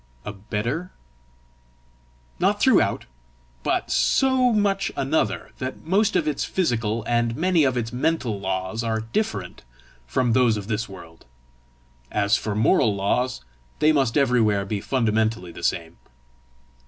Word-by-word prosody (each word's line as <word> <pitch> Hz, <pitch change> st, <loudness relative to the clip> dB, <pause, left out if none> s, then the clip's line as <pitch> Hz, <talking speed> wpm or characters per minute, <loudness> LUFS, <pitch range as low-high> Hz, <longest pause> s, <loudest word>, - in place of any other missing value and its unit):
"A 105 Hz, -, -5 dB
better?" 110 Hz, -, -3 dB, 1.5 s
"Not -, -, +2 dB
throughout; -, -, +3 dB, 0.6 s
but -, -, -1 dB
so 260 Hz, -2 st, +3 dB
much 200 Hz, -2 st, +1 dB
another 135 Hz, -, -1 dB
that 130 Hz, +3 st, -6 dB
most 195 Hz, +5 st, +2 dB
of -, -, +1 dB
its 150 Hz, -2 st, -1 dB
physical, 115 Hz, -, -1 dB
and 120 Hz, -1 st, 0 dB
many 175 Hz, -1 st, +3 dB
of 130 Hz, -2 st, +1 dB
its 115 Hz, -1 st, -3 dB
mental 125 Hz, -6 st, -1 dB
laws 95 Hz, +3 st, -3 dB
are 110 Hz, -1 st, -1 dB
different 110 Hz, -, -3 dB, 0.5 s
from 115 Hz, -, +1 dB
those 120 Hz, -3 st, +3 dB
of 100 Hz, -, -5 dB
this 110 Hz, 0 st, -2 dB
world. 85 Hz, -4 st, -13 dB, 0.9 s
As 105 Hz, +2 st, +2 dB
for 105 Hz, -1 st, -2 dB
moral 110 Hz, 0 st, +3 dB
laws, 125 Hz, +6 st, -1 dB, 0.4 s
they 155 Hz, -, +4 dB
must 135 Hz, -5 st, +1 dB
everywhere 115 Hz, -7 st, +2 dB
be 100 Hz, 0 st, -3 dB
fundamentally 110 Hz, -4 st, 0 dB
the 85 Hz, -, -10 dB
same." 85 Hz, -1 st, -2 dB
115 Hz, 130 wpm, -23 LUFS, 105-140 Hz, 1.5 s, they